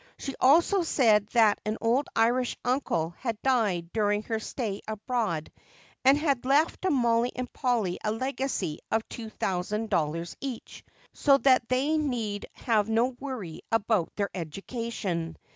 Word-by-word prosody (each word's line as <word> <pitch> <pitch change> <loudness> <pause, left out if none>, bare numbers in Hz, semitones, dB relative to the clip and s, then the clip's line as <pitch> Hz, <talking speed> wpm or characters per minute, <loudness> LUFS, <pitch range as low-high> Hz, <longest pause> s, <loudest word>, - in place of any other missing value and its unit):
She 275 - -5
also 340 +8 +5
said 220 - +3
that 220 -4 +4
an 215 +1 -2
old 240 +5 +1
Irish 240 +2 +2
uncle 245 - 0
had 230 -4 -3
died 205 -10 +1
during 210 -1 +1
her 225 0 -2
stay 215 -3 -4
abroad 215 -7 -2 0.5
and 270 +2 +6
had 285 -5 0
left 285 +5 +2
to 375 - +1
Mollie 240 -4 +2
and 250 -1 -5
Polly 230 -9 0
a 215 - 0
legacy 260 - -2
of 225 0 0
two 225 -2 -7
thousand 210 +3 -2
dollars 165 +2 -1
each, 265 -4 -7 0.3
so 280 -2 +4
that 255 -4 +3
they 280 +5 +2
need 230 -8 -2
have 220 -3 0
no 235 +3 +1
worry 220 - -6
about 215 -5 +1
their 200 -1 -1
education. 185 -1 -4
230 Hz, 145 wpm, -28 LUFS, 205-260 Hz, 0.5 s, and